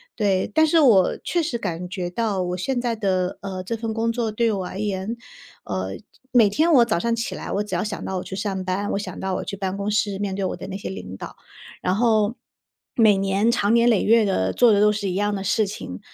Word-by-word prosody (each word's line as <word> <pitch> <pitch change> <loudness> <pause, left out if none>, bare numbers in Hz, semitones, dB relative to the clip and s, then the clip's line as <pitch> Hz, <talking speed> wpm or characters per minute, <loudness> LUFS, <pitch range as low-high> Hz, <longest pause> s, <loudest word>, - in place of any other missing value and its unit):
对。 195 -4 +1
但 315 0 +4
是 330 +2 +4
我 205 -9 +5
确 345 - 0
实 265 -7 -2
感 180 -4 -4
觉 180 -2 -3
到 205 -2 -1
我 180 0 -3
现 260 +6 -1
在 240 -1 -1
的， 185 -3 -1
呃， 190 -2 -5
这 230 +5 -3
份 225 0 -4
工 230 +1 0
作 230 -2 -2
对 230 +1 +1
我 190 -3 -2
而 195 - -7
言， 205 +2 -2 0.5
呃， - - -3 0.4
每 235 -4 +6
天 315 +11 +2
我 240 -4 +7
早 170 -7 0
上 235 +4 0
起 230 - -3
来， - - -6
我 200 - 0
只 210 -3 -8
要 175 - 0
想 210 -1 -5
到 190 - -3
我 180 - -3
去 190 - -7
上 195 -2 -3
班， 195 +2 -1
我 - - -1
想 205 - -6
到 190 0 -2
我 - - -3
去 200 - -6
办 190 -1 -2
公 200 +1 -2
室 205 -2 0
面 200 -2 -2
对 195 -1 -2
我 - - -2
的 - - -8
那 195 - -5
些 200 - -6
领 95 - -7
导， - - -8 0.5
然 185 - +1
后， 220 0 +2 0.6
每 215 -4 +5
年 195 +3 +1
长 215 -1 +1
年 235 +1 +5
累 220 -5 +3
月 230 0 +5
地 95 - 0
做 240 -2 +5
的 205 - +4
都 210 0 +5
是 205 -2 -2
一 180 - -3
样 205 +1 0
的 195 - -4
事 215 +2 +2
情。 95 - -7
205 Hz, 270 characters per minute, -23 LUFS, 190-230 Hz, 0.6 s, 我